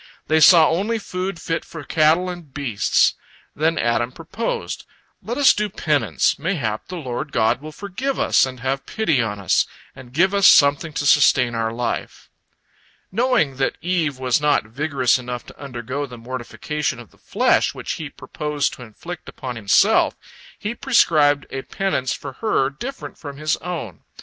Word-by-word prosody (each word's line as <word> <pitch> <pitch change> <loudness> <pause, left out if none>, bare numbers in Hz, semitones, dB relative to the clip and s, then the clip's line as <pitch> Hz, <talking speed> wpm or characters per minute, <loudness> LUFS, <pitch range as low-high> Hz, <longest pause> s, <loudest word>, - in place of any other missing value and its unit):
They 160 0 +3
saw 160 0 +8
only 205 +7 0
food 185 -3 -4
fit 165 0 -2
for 160 -3 -9
cattle 160 +5 +3
and 175 -5 -7
beasts. 130 -7 +2 0.4
Then 160 +2 +1
Adam 120 +1 +1
proposed: 165 - -4 0.3
"Let 240 +3 -4
us 285 -2 +6
do 210 0 -1
penance, 140 - 0
mayhap 140 - -2
the 185 - -6
Lord 135 -1 -5
God 115 0 +1
will 155 +1 -8
forgive 205 - -4
us - - +4
and 130 -2 -3
have 135 +2 -2
pity 160 - +1
on 105 -3 -3
us, 95 -4 +2 0.3
and 130 -2 -13
give 185 +8 +2
us 200 -1 +5
something 145 +3 +5
to 145 - -2
sustain 130 -4 +4
our 115 -1 -1
life." 120 +1 -4 0.8
Knowing 195 - +1
that 135 - 0
Eve 165 -6 0
was 130 +1 +1
not 150 -5 +2
vigorous 130 +1 +1
enough 125 -1 -6
to - - -15
undergo 135 +1 -4
the 125 -2 -10
mortification 130 +4 -4
of 120 - -13
the - - -25
flesh - - +1
which - - -5
he - - -5
purposed 150 -1 -3
to - - -11
inflict 155 +10 -9
upon 130 -3 -6
himself, 105 -4 +3 0.4
he 210 +3 -4
prescribed 155 - +3
a 135 - -3
penance 130 -7 -2
for 140 -2 -5
her 140 -11 +1
different 250 - -8
from 145 -2 -8
his 155 +1 0
own. 155 - -6
145 Hz, 165 wpm, -21 LUFS, 125-175 Hz, 0.8 s, saw